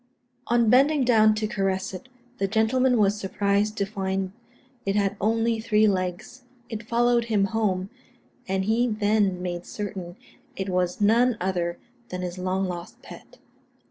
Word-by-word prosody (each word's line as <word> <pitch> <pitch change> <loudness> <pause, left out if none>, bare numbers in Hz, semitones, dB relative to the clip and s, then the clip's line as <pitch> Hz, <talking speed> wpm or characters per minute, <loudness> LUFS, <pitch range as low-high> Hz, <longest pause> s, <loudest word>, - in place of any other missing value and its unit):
On 235 -1 +3
bending 275 +5 +4
down 215 -3 +5
to 215 0 -1
caress 195 -3 -1
it, 190 +8 -9 0.3
the 195 - +1
gentleman 240 +4 +2
was 205 -1 +2
surprised 205 +2 0
to 200 - +1
find 190 -2 -3 0.5
it 195 0 -1
had 200 -1 +1
only 225 +2 +1
three 215 -1 +3
legs. 185 +5 -2 0.3
It 220 -3 -5
followed 240 0 +2
him 215 -4 +1
home, 195 -3 -1 0.6
and 190 0 -1
he 230 +4 +2
then 205 -4 +1
made 175 -1 -4
certain 190 -4 -6 0.4
it 190 0 -4
was 180 +1 -1
none 230 +3 +4
other 175 -2 -1 0.3
than 180 0 -5
his 180 0 -5
long 185 +1 -1
lost 175 -1 -7
pet. - - -13
205 Hz, 150 wpm, -25 LUFS, 190-225 Hz, 0.6 s, down